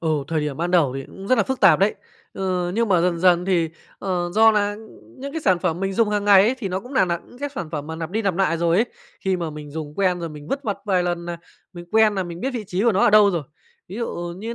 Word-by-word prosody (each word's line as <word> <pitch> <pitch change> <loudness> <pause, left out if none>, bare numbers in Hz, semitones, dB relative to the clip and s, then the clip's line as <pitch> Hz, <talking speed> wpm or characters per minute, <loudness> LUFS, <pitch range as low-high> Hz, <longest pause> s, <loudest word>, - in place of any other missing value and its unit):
Ừ, 165 - -2 0.2
thời 160 -1 0
điểm 150 -2 -3
ban 170 +3 -2
đầu 165 -8 +3
thì 135 0 -5
cũng 195 - -11
rất 255 - +5
nà 225 - +3
phức 265 +5 -3
tạp - - +6
đấy! 200 +2 +2 0.4
Ừ, 180 -2 -2
nhưng 230 +1 +1
mà 180 -3 +3
dần 175 -1 +1
dần 180 0 +4
thì, 175 -3 +1 0.3
ờ, 180 -3 -2
do 225 +1 +6
nà, 205 -1 +1
ưm, 220 +4 -16
những 280 +1 -6
cái 325 - -3
sản 185 - +2
phẩm 175 -1 -2
mình 195 0 -1
dùng 225 +2 +2
hàng 205 -1 0
ngày 200 -2 +7
ấy 230 +6 +2
thì 210 -6 -3
nó 185 +1 -2
cũng 245 +7 -12
nà 260 - +4
nà 170 -1 -1
những 245 - -16
cái 285 +1 -3
sản 170 -10 -5
phẩm 150 -3 -4
mà 160 0 -6
lặp 165 0 -5
đi 220 +4 -1
lặp 195 -4 0
nại 185 -2 +1
rồi 170 0 +1
ấy, 225 +5 +3 0.3
khi 190 -1 0
mà 170 -3 -4
mình 150 -1 -9
dùng 150 -1 -6
quen 185 -1 +1
rồi 170 - -4
mình 150 -1 -10
vứt 275 +1 -2
vặt 205 -7 -2
vài 185 -3 +1
lần 175 -1 -2
nà 175 0 -5 0.4
mình 175 -2 -9
quen 220 -1 +4
nà 190 - -1
mình 175 -1 -7
biết 265 - -1
vị 240 -5 -5
trí 180 +2 -2
của 235 0 +4
nó 195 - +1
ở - - +5
đâu 210 -1 +6
rồi. 170 -4 -2 0.5
Ví 190 - -8
dụ 175 -7 -4
như 225 +5 -5
185 Hz, 305 wpm, -22 LUFS, 170-210 Hz, 0.5 s, ngày